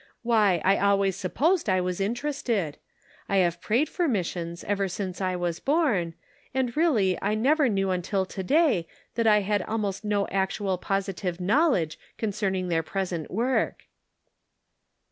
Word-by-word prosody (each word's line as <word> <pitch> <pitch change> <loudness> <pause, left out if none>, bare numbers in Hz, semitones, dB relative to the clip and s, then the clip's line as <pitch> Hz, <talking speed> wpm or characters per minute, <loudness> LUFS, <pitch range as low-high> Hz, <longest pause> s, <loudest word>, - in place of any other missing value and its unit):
Why, 210 -7 +3
I 195 +1 +4
always 200 -1 +2
supposed 280 - +1
I 185 -1 +3
was 180 +1 -2
interested. 230 - -1 0.5
I 200 - +1
have 175 -3 +2
prayed 245 +8 +1
for 350 -2 -1
missions 170 - -2
ever 200 -1 0
since 185 0 -5
I 185 -1 0
was 175 -2 -2
born, 255 - +1 0.4
and 255 -3 0
really 225 - +2
I 205 +2 0
never 275 +5 +3
knew 195 -2 0
until 190 +2 -1
to 190 - -6
day, 275 - +3 0.3
that 230 -1 +1
I 210 -1 +5
had 205 0 0
almost 210 -1 -3
no 205 -1 0
actual 190 -1 -1
positive 195 -2 -2
knowledge 190 - +2 0.2
concerning 195 -4 -1
their 165 -1 +2
present 175 -2 -3
work." 245 +6 0
195 Hz, 145 wpm, -26 LUFS, 185-230 Hz, 0.5 s, I